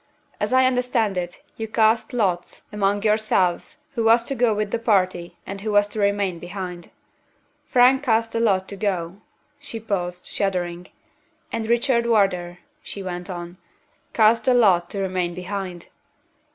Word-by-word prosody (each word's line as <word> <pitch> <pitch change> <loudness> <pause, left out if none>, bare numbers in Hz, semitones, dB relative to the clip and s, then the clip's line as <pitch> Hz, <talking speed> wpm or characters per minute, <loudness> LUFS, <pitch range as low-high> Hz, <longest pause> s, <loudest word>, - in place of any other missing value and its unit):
As - - -1
I 260 0 +5
understand 250 -5 +1
it, 175 -1 -5
you 225 - -4
cast 220 +2 +2
lots 190 -8 -1
among 205 0 0
yourselves 215 - +1
who 235 -4 -1
was 230 +1 +5
to 275 - -3
go 245 -3 +2
with 210 -1 -2
the 235 - -1
party, 185 -6 0
and 195 0 -7
who 215 +1 -2
was 205 0 +5
to 215 - -6
remain 200 -3 0
behind. 180 -1 -7 0.8
Frank 255 +2 +5
cast 225 -4 +1
the 230 - -1
lot 195 -5 +2
to 200 - -6
go." 185 -3 -2 0.4
She 225 - -6
paused, 180 -5 -3
shuddering. 180 -2 -2 0.6
"And 225 -1 -3
Richard 235 0 +2
Wardour," 185 -6 +1 0.2
she 200 - -7
went 180 0 -5
on, 175 0 -7 0.5
"cast 225 +1 +4
the 255 - +4
lot 185 -7 +4
to 200 - -4
remain 180 -2 -2
behind. 180 -1 -6
200 Hz, 155 wpm, -23 LUFS, 180-230 Hz, 0.8 s, I